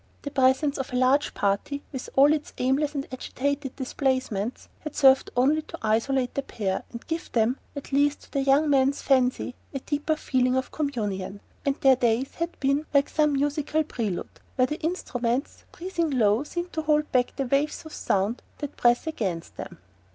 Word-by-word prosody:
The 285 - -4
presence 265 +2 +2
of 265 - -4
a - - -3
large 260 +3 +2
party, 205 +8 -1
with 260 -3 -6
all 285 +3 +6
its 300 -1 -3
aimless 285 +4 +1
and 275 0 -3
agitated 270 +1 -3
displacements, 260 -5 -2
had 305 -2 -7
served 265 -1 +5
only 290 +5 +3
to - - -10
isolate 245 +4 +1
the 275 - -1
pair 195 -8 -2
and 235 - -8
give 330 0 -4
them 235 +3 +1 0.2
(at 285 - -7
least 285 +1 +2
to - - -19
the 275 - 0
young 275 +3 +4
man's 275 -1 +2
fancy) 255 -2 +2 0.2
a - - -1
deeper 295 +3 -1
feeling 255 -4 +1
of 260 0 -1
communion, 205 -10 -3 0.3
and 275 - +2
their 270 -2 +6
days 240 +2 +1
there - - -21
had 345 - -27
been 275 +2 +1
like 280 0 +4
some 300 -1 +2
musical 290 +2 0
prelude, 220 -10 -4 0.2
where 255 - +4
the 300 +4 -4
instruments, 260 -6 -2
breathing 340 -2 -2
low, 230 -3 +3
seem 345 +3 -4
to 315 - -3
hold 300 -1 +1
back 250 -1 +1
the 275 - -1
waves 280 +5 0
of 315 - -10
sound 200 +5 0 0.2
that 290 -1 -6
press 240 0 +3
against 190 - -3
them. - - -7
270 Hz, 185 wpm, -26 LUFS, 250-295 Hz, 0.3 s, all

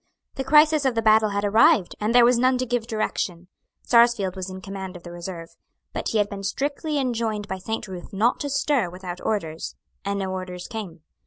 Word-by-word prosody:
The 270 - -3
crisis 300 +2 +5
of 265 -3 +1
the 225 - 0
battle 215 0 +5
had 200 0 -1
arrived; 205 -3 +4
and 215 +3 0
there 245 -1 +8
was 240 0 +4
none 255 +1 +3
to 255 - -1
give 245 -2 -2
direction. 180 -5 -3 0.3
Sarsfield 235 -6 +4
was 190 0 -5
in 185 0 -7
command 190 -1 -7
of 175 - -11
the 175 - -9
reserve. 175 -1 -7 0.4
But - - -3
he 225 - 0
had 205 -1 +2
been 200 -1 -7
strictly 285 - -2
enjoined 230 -5 -1
by 190 0 -4
Saint 220 +3 -4
Ruth 180 -2 -8
not 220 +5 +1
to 285 - -3
stir 280 -7 +1
without 180 0 -7
orders; 165 -7 -3 0.3
and 200 0 -2
no 190 -1 -2
orders 185 -1 -5
came. 185 -8 -7
210 Hz, 210 wpm, -24 LUFS, 185-240 Hz, 0.4 s, there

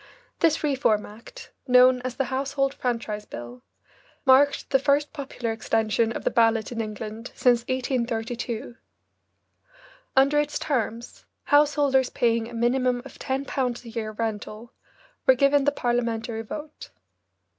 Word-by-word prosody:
This 320 -2 +2
Reform 265 -8 +1
Act, 230 - -13 0.2
known 250 0 +6
as 250 -1 -5
the 270 - 0
Household 275 0 0
Franchise 230 -5 -3
Bill, 120 +1 -9 0.6
marked 275 +2 +4
the 270 - +4
first 285 +2 +1
popular 270 -5 -4
extension 225 0 0
of - - -5
the - - +1
ballot 225 -2 +2
in 230 -1 -2
England 215 +2 -6
since 245 -2 +4
1832. 240 -2 -3 1.4
Under 275 +2 +4
its 295 0 -1
terms, 235 -4 -3 0.2
householders 290 -3 +3
paying 230 -1 0
a - - -11
minimum 245 +1 +1
of - - -12
ten 265 +1 -2
pounds 250 -3 -2
a - - -8
year 225 -1 -4
rental 220 +1 -5 0.5
were 260 - +7
given 275 +1 +3
the 290 - +4
Parliamentary 235 -3 -2
vote. 300 +7 -8
245 Hz, 135 wpm, -25 LUFS, 225-275 Hz, 1.4 s, were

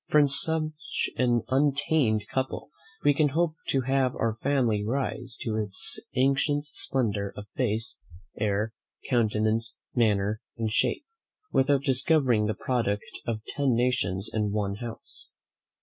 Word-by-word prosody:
From 150 -1 +5
such 155 +1 +1
an 120 -2 +2
untainted 135 -5 +2
couple 130 +2 -3 0.3
we 145 - +5
can 150 +1 +3
hope 170 -2 +2
to 135 - +2
have 130 0 +1
our 115 -1 0
family 125 -7 +1
rise 125 +1 -3
to 110 -2 -2
its 105 -3 -1 0.2
ancient 140 +3 +2
splendour 110 -8 -1
of 105 - -7
face, 115 -1 0 0.4
air, 105 +1 -1 0.3
countenance, 110 -2 +1 0.2
manner, 105 -2 +1 0.2
and 110 -2 -1
shape, 300 - +1 0.5
without 135 +1 +3
discovering 130 -5 +2
the 110 - -1
product 110 -4 -1 0.2
of 110 -2 -3
ten 140 -4 +1
nations 120 -6 +1
in 105 -2 0
one 100 -1 -1
house. 115 0 -8
120 Hz, 130 wpm, -27 LUFS, 110-135 Hz, 0.5 s, From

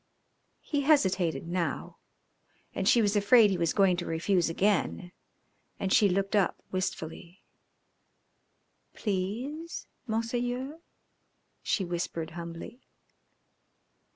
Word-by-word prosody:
He 290 -2 -1
hesitated 190 - +2
now, 170 -4 -3 0.7
and 190 - +1
she 235 - +5
was 205 0 +1
afraid 210 +1 +6
he 190 - 0
was 170 -1 +2
going 195 -3 +3
to 175 - -3
refuse 170 +2 +1
again, 185 0 0 0.7
and 190 -1 0
she 215 -5 +5
looked 195 +3 0
up 200 -3 +2
wistfully. 180 -1 -4 1.5
"Please, 235 - -3 0.2
Monseigneur," 245 +6 -2 0.8
she 195 - 0
whispered 170 -2 -3
humbly. 170 +8 -8
195 Hz, 100 wpm, -29 LUFS, 175-230 Hz, 1.5 s, afraid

